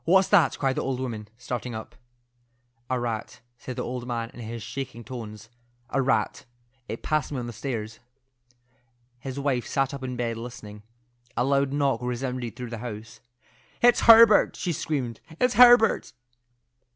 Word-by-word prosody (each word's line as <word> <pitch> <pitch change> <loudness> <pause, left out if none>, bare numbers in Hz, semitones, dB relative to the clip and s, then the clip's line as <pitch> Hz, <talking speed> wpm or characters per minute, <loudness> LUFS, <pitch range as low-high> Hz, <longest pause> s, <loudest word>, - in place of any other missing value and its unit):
"What's 190 +2 +4
that?" 170 -9 +4
cried 135 -2 0
the - - +1
old 130 -1 -2
woman, 115 -5 -5
starting 125 -1 -5
up. 110 - -8 1.0
"A 130 -1 0
rat," 115 -2 -4 0.2
said 130 - -7
the - - -3
old 125 0 -5
man 115 -2 -3
in 115 -1 -7
shaking 120 +2 -6
tones—"a 120 +2 -7
rat. 135 0 0 0.4
It 115 - -6
passed 155 -2 0
me 140 - -3
on 120 - -3
the 120 - -6
stairs." 115 -2 -5 1.2
His 130 +1 -6
wife 135 -4 -1
sat 135 0 0
up 140 - -6
in 130 -1 -4
bed 115 -1 -2
listening. 110 -3 -9 0.6
A 120 - +2
loud 140 0 +2
knock 140 -1 +1
resounded 125 -2 -3
through 125 -1 -7
the 115 - -5
house. 110 -2 -8 0.6
"It's 245 0 +6
Herbert!" 225 -2 +8
she 175 - -2
screamed. 130 -7 -3 0.2
"It's 250 0 +3
Herbert!" 240 -2 +6
125 Hz, 155 wpm, -26 LUFS, 115-140 Hz, 1.2 s, Herbert